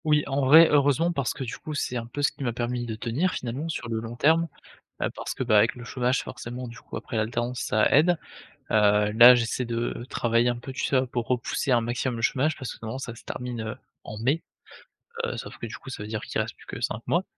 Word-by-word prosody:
Oui, 150 -1 +4
en 140 0 -1
vrai 160 +5 +8
heureusement 145 +3 +3
parce 140 -7 -1
que - - -5
du 120 - -5
coup, 155 - -6
c'est 125 - -2
un 115 -1 -3
peu 145 +4 -5
ce - - +4
qui - - -8
m'a 120 -3 -1
permis 120 0 -2
de 110 - -3
tenir 125 +12 -1
finalement 130 +7 -4
sur 140 -6 -4
le 115 -1 -2
long 115 +1 -6
terme, 160 +6 +3 0.5
heu, - - +1
parce - - -5
que, - - -4
beh, 120 -4 +2
avec 105 +3 +4
le 120 - -10
chômage 125 +1 0
forcément 125 +1 -7
du 115 0 -10
coup - - -9
après - - -6
l'alternance 120 +3 -1
ça 110 0 +2
aide. 165 +4 +4 0.5
Heu, 105 -1 +4
là 120 +3 +9
j'essaie 120 +2 -1
de 120 0 -3
travailler 115 +1 +2
un 120 - 0
peu 130 +2 -8
tu 130 - -3
sais, 130 -1 +2
pour 120 -2 -2
repousser 125 +2 -1
un 120 -2 +5
maximum 120 +2 -2
le 115 - -5
chômage 145 +6 +1
parce 130 - -5
que - - -15
normalement 115 +3 -4
ça 120 -3 -6
se 115 - -14
termine 120 -3 -5 0.3
en 105 - -8
mai, 135 +9 +1 0.8
heu, 475 - -2
sauf - - -8
que - - -5
du - - -7
coup 135 - -11
ça 105 - -6
veut - - -8
dire 110 0 -3
qu'il - - -2
reste - - -3
plus - - -19
que - - -7
5 110 - -2
mois. 175 +3 +2
125 Hz, 250 wpm, -26 LUFS, 115-140 Hz, 0.8 s, là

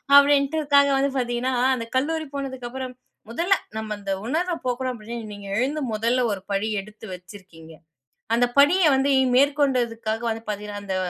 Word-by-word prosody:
அப்பிடின்டு 285 +2 +5
உக்காந்து 280 -1 +5
வந்து 275 +1 +2
பார்த்தீங்கன்னா, 245 +1 -1 0.2
அந்த 230 -2 -5
கல்லூரி 315 +4 0
போனதுக்கப்பறம் 260 -1 -5 0.3
முதல்ல 340 +11 +2 0.2
நம்ம 220 -1 -4
அந்த 200 -1 -4 0.2
உணர்வ 345 +7 0
போக்கணும் 255 +1 -1
அப்பிடின்னு 225 -1 -7
நீங்க 205 -1 -10
எழுந்து 280 +6 0
முதல்ல 230 +4 +1
ஒரு 195 - -6
படி 200 +2 0
எடுத்து 215 +2 -13
வச்சிருக்கீங்க. 180 -3 -14 0.6
அந்த 245 - +4
படிய 355 +7 +5
வந்து 270 +1 +1 0.3
மேற்கொண்டதுக்காக 250 -6 +1
வந்து 225 0 -5
பார்த்தீங்கன்னா, 205 0 -5
அந்த 190 - -2
245 Hz, 145 wpm, -24 LUFS, 215-280 Hz, 0.6 s, அப்பிடின்டு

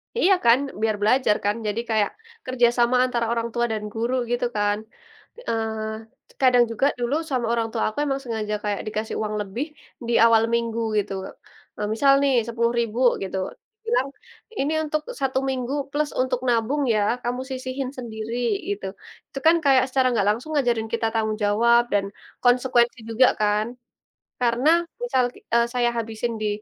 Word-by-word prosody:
Iya, 395 -4 +4
kan? 235 +3 +6 0.2
Biar 220 -1 +1
belajar, 220 0 +3
kan? 205 - +2
Jadi, 210 +3 -1
kayak 215 -2 +2 0.3
kerjasama 240 -1 +2
antara 240 -2 -1
orang 230 0 -1
tua 240 0 +1
dan 215 -1 -3
guru, 235 +3 -1 0.2
gitu 245 0 0
kan? 205 0 +1 0.7
Eee, 220 0 -5
kadang 250 -2 +6
juga 230 +5 0
dulu, 245 +4 0
sama 250 -3 0
orang 230 -1 0
tua - - -1
aku 215 - -13
emang 275 -1 -1
sengaja 220 -3 -3
kayak 205 -1 -1
dikasih 215 +1 -3
uang 215 0 -2
lebih 210 +8 -4 0.4
di 240 - 0
awal 225 -1 +5
minggu, 230 -1 0 0.2
gitu. 200 -1 -3 0.6
Eee, 210 0 -2
misal 275 +4 +4
nih, 275 - +3
10.000 235 0 0 0.2
gitu, 190 0 -4 0.4
dibilang, 450 - 0 0.5
"Ini 290 +3 0
untuk 305 0 -1 0.2
1 265 -1 +1
minggu, 255 0 -2 0.2
plus 295 0 -1
untuk 255 -1 0
nabung 245 +5 +1
ya, 210 - +2 0.2
kamu 245 +1 -2
sisihin 260 0 -4
sendiri," 230 -1 -5 0.3
gitu. 200 -1 -3 0.4
Itu 275 - -5
kan 330 - +7
kayak, 265 -2 +5
secara 260 0 +2
nggak 205 -4 +1
langsung 240 +9 -2
ngajarin 240 -6 +1
kita 225 -1 +1
tanggung 220 -1 0
jawab, 235 +3 +4
dan 200 -1 +2 0.4
konsekuensi 245 -1 +3
juga, 250 +3 +5
kan? 210 +1 +1 0.7
Karena, 245 +4 +2 0.3
misal 260 - +2
ki - - -16
eee, 235 0 +4
saya 240 -1 +2
habisin 230 +1 -3
di 215 - 0
235 Hz, 160 wpm, -23 LUFS, 220-255 Hz, 0.7 s, kan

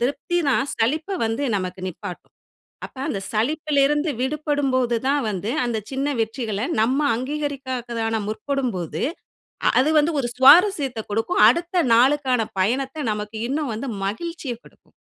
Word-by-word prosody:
திருப்திதான் 280 +2 0
சலிப்ப 310 - 0
வந்து 225 +5 -2
நமக்கு 185 0 -4
நிப்பாட்டும். 180 +1 -9 0.5
அப்ப - - -15
அந்த 215 -10 -2
சலிப்பில 285 +6 +1
இருந்து 295 +2 0
விடுபடும்போதுதான் 270 -2 0
வந்து, 205 +2 -3
அந்த 235 -2 -1
சின்ன 270 +1 -1
வெற்றிகள 220 -2 -3 0.2
நம்ம 255 +5 +2 0.2
அங்கீகரிக்கிறதுக்கான 255 -4 -3
முற்படும்போது, 215 - -3 0.7
அ - - +6
அது 295 - +1
வந்து 310 +3 +1
ஒரு 240 - -2
சுவாரசியத்த 280 - +6
குடுக்கும். 225 +4 +1
அடுத்த 345 +6 +1
நாளுக்கான 260 0 +3 0.2
பயணத்த 265 +9 0
நமக்கு 210 +1 -6
இன்னும் 285 -2 -1
வந்து 255 +5 -4 0.2
மகிழ்ச்சிய 275 - -4
குடுக்கும். - - -22
260 Hz, 125 wpm, -22 LUFS, 225-295 Hz, 0.7 s, அ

